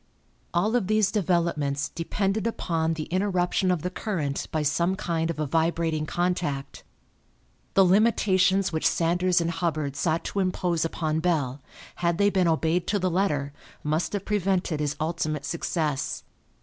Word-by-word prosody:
All 205 +7 +1
of 225 -7 +1
these 215 -2 +2
developments 165 -7 0
depended 195 +5 -1
upon 165 -7 -1
the 155 - -3
interruption 185 -1 +1
of 180 -4 0
the 180 - -2
current 160 -9 -3
by 155 -1 0
some 170 +5 +1
kind 165 -4 -1
of 170 - -3
a 155 - -1
vibrating 160 0 0
contact. 175 -6 -2 0.9
The 195 - +6
limitations 195 -1 +3
which 160 - +2
Sanders 175 +2 +2
and 170 0 0
Hubbard 155 -5 -2
sought 160 +3 0
to 200 - -3
impose 180 -3 0
upon 160 -1 -1
Bell, 145 -6 0 0.4
had 170 -1 +1
they 205 0 +3
been 185 -3 +2
obeyed 165 +2 +1
to 205 - +1
the 185 -2 0
letter, 150 -6 0 0.3
must 155 +6 -1
have 200 -1 -3
prevented 190 -5 0
his 150 -1 -1
ultimate 155 -2 -2
success. 155 -4 -2
170 Hz, 150 wpm, -26 LUFS, 155-185 Hz, 0.9 s, The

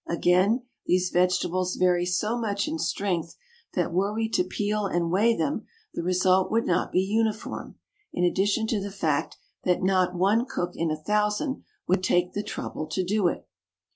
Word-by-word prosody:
Again, 185 +8 +3 0.2
these 180 0 +2
vegetables 180 0 +1
vary 180 -1 +2
so 210 +6 0
much 205 -4 -1
in 320 +1 -3
strength 180 - -2 0.4
that - - 0
were 195 +3 +1
we 220 +1 -1
to 180 - +2
peel 205 +2 -1
and 170 -2 -1
weigh 225 +5 +3
them 285 - -2 0.3
the - - -3
result 185 +1 +2
would 230 +1 +1
not 180 +1 0
be 185 - +3
uniform, 215 +2 -2 0.4
in 175 - -1
addition 200 +5 +2
to 220 -2 -1
the 200 - -4
fact 160 -7 -1 0.3
that 180 0 +1
not 185 -1 +2
one 205 +7 +2
cook 175 -8 -2
in 165 0 -1
a 155 - -1
thousand 210 - -1 0.2
would 185 +1 +2
take 180 -1 +2
the 205 - -1
trouble 155 -6 -5
to 170 +4 -1
do 195 +1 +1
it. - - -3
185 Hz, 175 wpm, -26 LUFS, 180-210 Hz, 0.4 s, Again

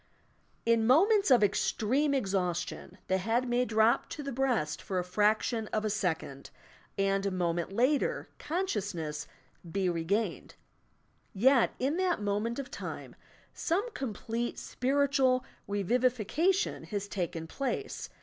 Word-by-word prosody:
lu 230 0 +4
moments 345 - +4
of 245 -5 +6
extreme 255 +8 +1
exhaustion, 190 -6 -2
the 190 0 +1
head 230 +6 0
may 245 +1 +2
drop 220 0 +3
to 295 - -6
the 275 - -4
breast 240 - 0
for 190 - -3
a 180 - +1
fraction 215 +4 +1
of 215 0 -2
a 215 - +1
second, 165 -9 -2 0.5
and 195 0 +1
a 200 - +1
moment 175 -2 -1
later 255 +8 +1
consciousness 200 - -3 0.4
be 195 0 0
re 170 -2 -1
gained, 205 +7 -1 0.8
yet, 250 +5 +4
in 275 +6 0
that 370 -5 +1
moment 210 +3 -1
of 275 0 -5
time, - - -7 0.4
some 400 +9 -1
complete 235 - -3
spiritual 265 -1 +1 0.2
revivification 250 - +1
has 205 -2 -4
taken 175 -4 -3
place. 275 - -4
220 Hz, 130 wpm, -30 LUFS, 195-265 Hz, 0.8 s, of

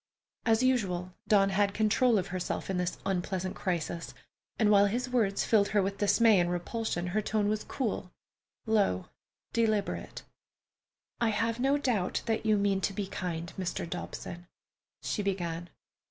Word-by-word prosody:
As 225 +2 +4
usual, 185 -8 +1
Dawn 195 -2 +5
had 200 +1 +1
control 220 +2 +3
of 190 -1 -1
herself 185 +1 -3
in 190 - -1
this 180 0 -1
unpleasant 185 0 -2
crisis, 170 -2 -3 0.4
and 215 -2 +4
while 200 0 +6
his 250 +5 -2
words 210 -6 +1
filled 205 -3 +4
her 210 -1 +2
with 195 +1 -3
dismay 215 0 +5
and 175 0 +2
repulsion 175 +1 -2
her 190 +4 0
tone 210 0 0
was 215 0 0
cool, 220 -8 -3 0.5
low, 200 - +1 0.4
deliberate: 215 -3 0 1.0
"I 235 - +2
have 225 +2 0
no 270 +3 +3
doubt 235 -10 0 0.2
you 215 -1 +3
mean 200 -1 +1
to 195 - 0
be 200 +1 -2
kind, 170 -2 -4
Mr. 180 -2 -2
Dobson——" 175 0 -6 0.6
she 210 - -1
began. 175 -4 -2
200 Hz, 150 wpm, -30 LUFS, 180-220 Hz, 1.0 s, while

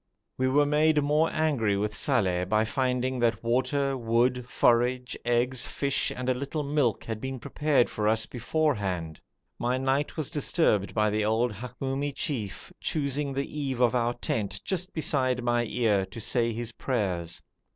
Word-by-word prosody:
We 130 - +1
were 145 +3 +4
made 150 +1 +3
more 150 +3 +3
angry 130 -11 +1
with 105 +1 -1
Saleh 95 -9 +1
by 110 0 +3
finding 125 +2 0
that 115 -2 +1
water, 130 +3 +1
wood, 125 +1 +1
forage, 125 +1 +2
eggs, 120 +1 +1
fish, 140 -1 0
and 125 0 -5
a 130 - +3
little 140 +4 -3
milk 140 -5 +1
had 110 -1 -5
been 130 0 -4
prepared 145 0 +1
for 105 -1 -2
us 110 +1 +2
beforehand. 105 - -1 0.4
My 125 +2 0
night 135 +4 0
was 155 -1 -3
disturbed 145 - +1
by 105 -1 +2
the 105 0 0
old 110 +2 +1
Hamoumi 135 +5 -3
chief 115 - -4
choosing 140 -1 -1
the 140 +1 -1
eave 135 -4 -2
of 125 -1 +4
our 120 -1 +1
tent 100 -4 -2
just 185 0 -2
beside 130 -5 0
my 120 0 +1
ear 105 -5 +1
to - - -9
say 115 +1 0
his 115 +1 -4
prayers. 95 -10 -2
125 Hz, 160 wpm, -28 LUFS, 110-140 Hz, 0.4 s, were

